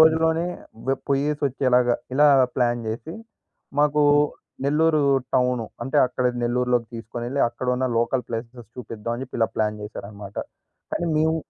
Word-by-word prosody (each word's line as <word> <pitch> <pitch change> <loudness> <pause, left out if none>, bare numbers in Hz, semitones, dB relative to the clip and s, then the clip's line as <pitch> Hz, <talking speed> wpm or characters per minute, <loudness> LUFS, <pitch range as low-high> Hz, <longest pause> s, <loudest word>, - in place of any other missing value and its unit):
రోజులోనే 160 +1 +4 0.4
వె 135 - +4 0.2
పోయ్యేసి 145 +2 +1
ఒచ్చేలాగ, 125 -1 +2 0.3
ఇలా 150 +2 +6 0.3
ప్లాన్ 120 -1 +1
జెసి, 125 +9 -5 0.7
మాకు 150 0 +3 0.6
నెల్లూరు 155 +1 +3 0.3
టౌను. 125 -2 +2 0.2
అంటే, 135 +3 -2
అక్కడ 125 0 -3 0.2
నెల్లూరులోకి 120 -1 +1
తీసుకొనెళ్ళి 120 +4 -4
అక్కడున్న 125 +1 -1
లోకల్ 120 +2 0
ప్లేసెస్ 115 0 -6
చూపిద్దాం 115 -1 -5
అని 125 - -5
జెప్పి 125 - -8
ఇలా 115 - +2
ప్లాన్ 105 -1 0
చేశారనమాట. 100 -1 -9 0.5
కానీ 175 - -1
మేము 160 +1 +2
125 Hz, 130 wpm, -24 LUFS, 115-150 Hz, 0.7 s, ఇలా